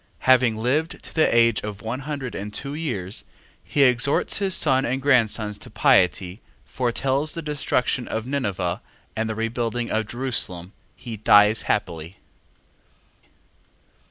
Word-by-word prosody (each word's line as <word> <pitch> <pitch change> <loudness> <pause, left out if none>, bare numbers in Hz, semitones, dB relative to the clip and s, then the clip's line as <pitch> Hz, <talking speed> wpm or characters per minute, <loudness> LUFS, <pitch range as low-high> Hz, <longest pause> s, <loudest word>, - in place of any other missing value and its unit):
Having 125 -3 +4
lived 140 +8 -1
to - - -9
the 160 - +3
age 115 -1 +4
of 105 0 -7
one 115 +3 -3
hundred 140 -3 -5
and 105 +1 -6
two 140 +6 -4
years, 115 - -4 0.4
he 145 - +1
exhorts 125 +6 +2
his 195 -2 +1
son 130 0 +3
and 130 +1 -1
grandsons 115 -6 +1
to - - -10
piety, 90 +2 +2 0.2
foretells 135 +4 -1
the 165 - -4
destruction 140 -4 -1
of 110 0 -3
Ninive 100 -10 -2 0.4
and 110 0 -2
the 110 - -3
rebuilding 115 +1 -2
of 110 0 -1
Jerusalem: 105 -8 -2 0.2
he 115 -3 -8
dies 105 +1 +5
happily. 90 -3 -2
120 Hz, 135 wpm, -23 LUFS, 105-135 Hz, 0.4 s, dies